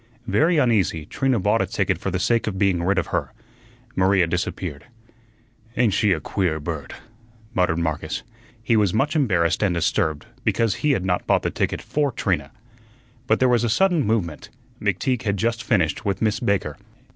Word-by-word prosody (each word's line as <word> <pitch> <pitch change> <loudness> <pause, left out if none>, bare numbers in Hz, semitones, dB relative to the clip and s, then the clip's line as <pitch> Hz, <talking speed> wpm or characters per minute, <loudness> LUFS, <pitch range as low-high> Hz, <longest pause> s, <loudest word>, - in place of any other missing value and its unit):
Very 160 +7 +2
uneasy, 105 - +2
Trina 130 - 0
bought 90 - +2
a - - 0
ticket - - -1
for - - -3
the 95 - -1
sake 115 +5 +1
of 100 -3 -2
being 95 -3 +2
rid 95 +3 +1
of 95 - 0
her. - - -1 0.6
Maria 95 -1 +3
disappeared. 85 -3 -3 0.9
"Ain't 115 -5 +3
she 105 +1 +2
a 85 - +2
queer 80 0 -1
bird?" 75 -3 -5 0.6
muttered 90 -3 +1
Marcus. 80 -2 -2 0.4
He 115 - +2
was 105 -4 +2
much 145 +7 +1
embarrassed 90 - +2
and 95 -4 +2
disturbed 80 -2 0 0.2
because 110 0 +1
he 150 -2 +3
had 95 -7 -1
not 90 -1 -1
bought - - +2
the - - -1
ticket - - -2
for 145 -2 0
Trina. 85 - -1 0.8
But - - +3
there 130 - +4
was 120 -2 +3
a 120 - +1
sudden 175 - +3
movement. 100 -9 -2 0.3
McTeague 130 -2 0
had 100 -5 -1
just 115 +2 0
finished 90 -10 +1
with 100 -2 -1
Miss 110 -2 +1
Baker. 95 -8 -1
100 Hz, 180 wpm, -23 LUFS, 85-115 Hz, 0.9 s, there